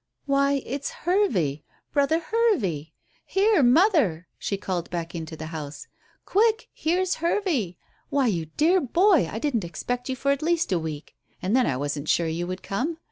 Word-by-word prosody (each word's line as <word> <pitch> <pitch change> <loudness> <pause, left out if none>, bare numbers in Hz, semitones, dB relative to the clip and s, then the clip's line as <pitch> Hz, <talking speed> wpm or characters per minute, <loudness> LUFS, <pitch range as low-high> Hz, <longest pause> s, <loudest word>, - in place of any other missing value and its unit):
"Why, 280 -1 +2
it's 280 +2 -3
Hervey 200 - 0 0.3
brother 285 +2 +3
Hervey. 280 - 0 0.3
Here, 400 -2 +3
mother," 250 - +4
she 200 - -2
called 180 -3 -3
back 170 -1 -4
into 160 -2 -6
the 155 - -6
house. 145 -2 -6 0.4
"Quick, 445 +2 +2
here's 360 +3 0
Hervey. 330 - 0 0.3
Why, 280 -2 +2
you 170 -9 0
dear 350 +5 +4
boy, 335 - +3
I - - -4
didn't 235 -4 0
expect 245 +10 -4
you 260 - -1
for 275 +3 0
at 280 - 0
least 330 -4 +1
a 180 - +2
week 155 -2 -6 0.3
and 190 +5 0
then 255 - +4
I 135 -4 0
wasn't 145 +2 -3
sure 170 - +3
you 170 +2 -2
would 185 +1 -5
come. 280 +12 -2
245 Hz, 170 wpm, -25 LUFS, -, 0.4 s, mother